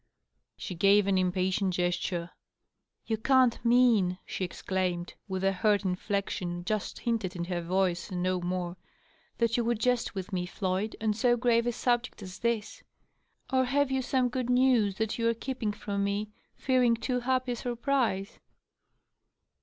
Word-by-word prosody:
She 185 - -5
gave 200 +3 +4
an 195 -1 +2
impatient 185 +1 0
gesture. 175 -1 -1 0.4
" - - -55
You 220 - -1
can't 255 +1 +3
mean," 235 -7 +4
she - - -4
exclaimed, 180 -1 -2
with 190 -1 -3
a 195 - +3
hurt 205 +1 +1
inflection 180 -2 -2
just 215 +1 -2
hinted 220 -6 -1
in 170 - -3
her 175 -1 -2
voice 180 +1 0
and 180 -2 -3
no 185 0 0
more, 180 0 -3 0.3
" - - -35
that 230 0 +1
you 240 - +1
would 235 0 +1
jest 240 -1 0
with 190 +1 -5
me, 180 -1 -1
Floyd, 190 +3 -2
on 220 -1 +1
so 240 +3 +2
grave 235 -1 +2
a - - +2
subject 240 -2 -1
as 185 -1 -9
this? 235 - -2 0.7
Or 260 0 +4
have 280 +1 +1
you 265 0 +1
some 255 -1 +1
good 250 0 -3
news 250 -5 +3
that 220 +2 -2
you 230 0 +2
are 230 - 0
keeping 235 -2 -3
from 200 -1 -3
me, 205 +1 -2 0.2
fearing 250 -3 +3
too 250 +2 -1
happy 255 0 0
a - - -1
surprise 240 -4 -1
210 Hz, 170 wpm, -29 LUFS, 185-240 Hz, 0.7 s, gave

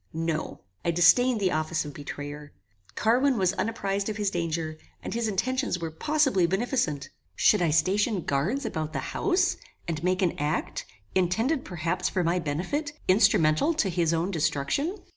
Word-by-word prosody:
No. 160 -1 -3 0.2
I - - 0
disdained 195 +9 +5
the 190 -3 +1
office 155 0 -1
of 145 - -7
betrayer. 145 +1 -7 0.4
Carwin 250 +4 +3
was 185 -2 +2
unapprized 200 -2 -2
of 210 - -4
his 205 -2 0
danger, 165 -2 -2 0.2
and - - -4
his 230 0 -1
intentions 255 +2 0
were 165 -2 -4
possibly 270 - +2
beneficent. 190 - -1 0.3
Should 210 - +4
I 170 - +2
station 190 +6 +2
guards 165 - -1
about 155 0 -3
the - - -4
house, 375 -1 +1 0.3
and 165 -2 -3
make 185 +1 +1
an 175 - 0
act, 150 +1 -2 0.3
intended 225 - +1
perhaps 175 +1 -2
for 185 - 0
my 170 +2 +1
benefit, 185 - -2
instrumental 185 - +4
to 230 -11 +1
his 170 -2 +1
own 170 +3 0
destruction? 160 - 0
180 Hz, 160 wpm, -27 LUFS, 160-225 Hz, 0.4 s, disdained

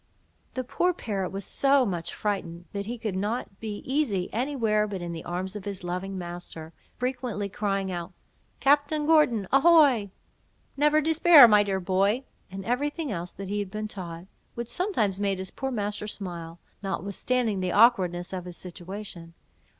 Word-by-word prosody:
The 255 - -1
poor 355 +8 +1
parrot 195 - -3
was 195 -1 -4
so 275 -1 +3
much 175 -5 -3
frightened, 175 -5 -3
that 200 0 -4
he 240 +2 -4
could 220 -4 -3
not 205 +1 -3
be 215 -2 -5
easy 255 -10 0
any 260 +6 -1
where 215 -4 +2
but 200 -2 -4
in 175 -1 -5
the 165 - -6
arms 185 +3 -4
of 210 - -7
his 200 -3 -5
loving 185 +2 -4
master, 175 -2 -7 0.2
frequently 245 -5 -2
crying 195 -1 -1
out—"Captain 285 - -1
Gordon, 295 -11 +4
ahoy!" 275 -7 +5 0.7
"Never 300 +2 +4
despair, 320 -3 +8
my 210 -2 +6
dear 195 -2 0
boy!" 195 +7 +1 0.3
and 190 0 -7
every 250 +5 +1
thing 300 -1 -5
else 175 -2 -4
that 195 0 -7
he 205 +1 -1
had 200 -2 -3
been 215 +2 -4
taught, 175 -4 -7 0.3
which 235 0 -5
sometimes 220 - 0
made 200 -1 0
his 190 0 -6
poor 270 - -3
master 210 -3 -3
smile, 170 -5 -6 0.2
notwithstanding 200 +3 -1
the 185 -1 -1
awkwardness 185 -6 +3
of 180 -1 -4
his 180 -1 -7
situation. 180 -1 -8
205 Hz, 165 wpm, -27 LUFS, 185-250 Hz, 0.7 s, despair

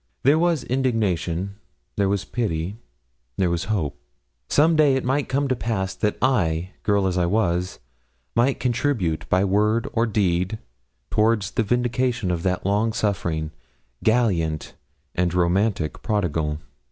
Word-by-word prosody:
There 145 +4 +5
was 170 -5 +2
indignation, 100 - -1 0.4
there 100 -1 +1
was 100 0 -1
pity, 95 -5 -2 0.6
there 90 -2 +2
was 85 0 -1
hope. 80 -9 -2 0.5
Some 160 +3 +4
day 150 -3 +5
it 130 - -1
might 135 +3 0
come 140 +1 +1
to 130 - +1
pass 100 -5 -2
that 105 -1 -1
I, 90 -9 +1
girl 100 -2 +2
as 90 -1 0
I 85 - +2
was, 90 -3 0 0.6
might 125 +3 +2
contribute 120 - 0
by 95 +2 +3
word 105 +5 +2
or 115 0 +2
deed 95 -1 0 0.5
towards 110 -2 +2
the - - 0
vindication 120 -2 0
of 85 -1 -1
that 90 0 -1
long 105 +3 +1
suffering, 85 -7 -1 0.5
gallant, 95 -10 +1 0.4
and 90 0 0
romantic 90 -1 +1
prodigal. 85 -8 -1
100 Hz, 140 wpm, -23 LUFS, 90-120 Hz, 0.6 s, There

